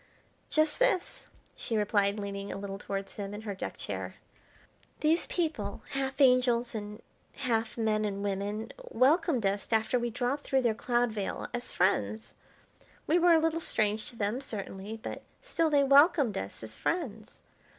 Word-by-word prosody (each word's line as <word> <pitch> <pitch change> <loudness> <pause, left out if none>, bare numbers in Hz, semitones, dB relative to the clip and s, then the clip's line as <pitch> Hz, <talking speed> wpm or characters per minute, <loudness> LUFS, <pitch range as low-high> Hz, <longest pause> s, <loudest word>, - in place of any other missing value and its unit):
"Just 310 -1 +2
this," - - 0 0.3
she 225 - -2
replied, 205 -1 +2
leaning 200 -1 -4
a - - -4
little 195 0 -6
towards 195 -1 -5
him 200 0 -4
in 210 - -7
her 210 -2 -4
deck 190 - -6
chair. - - -5 0.9
"These 320 +3 +2
people, 310 - -2
half 270 0 -2
angels, 250 -3 +4
and 210 0 -6 0.3
half 230 -5 -1
men 215 -2 +1
and 200 -1 -2
women, 205 +2 -2 0.2
welcomed 300 - +3
us 200 +1 0
after 220 +2 +2
we 240 0 -1
dropped 250 +4 -2
through 265 -1 +1
their 235 -2 +3
cloud 240 +1 +1
veil, 205 -3 -3
as 245 0 -3
friends; 110 - 0 0.7
we 340 +3 +3
were 345 0 +6
a 325 - +6
little 325 +1 +1
strange 215 -7 0
to - - -13
them, 220 +4 -1
certainly, 205 -3 -6
but - - -5 0.2
still 330 -10 +1
they 290 -2 +4
welcomed 280 - +5
us 95 +3 -5
as 110 0 -6
friends. 225 - -3
225 Hz, 160 wpm, -30 LUFS, 200-275 Hz, 0.9 s, were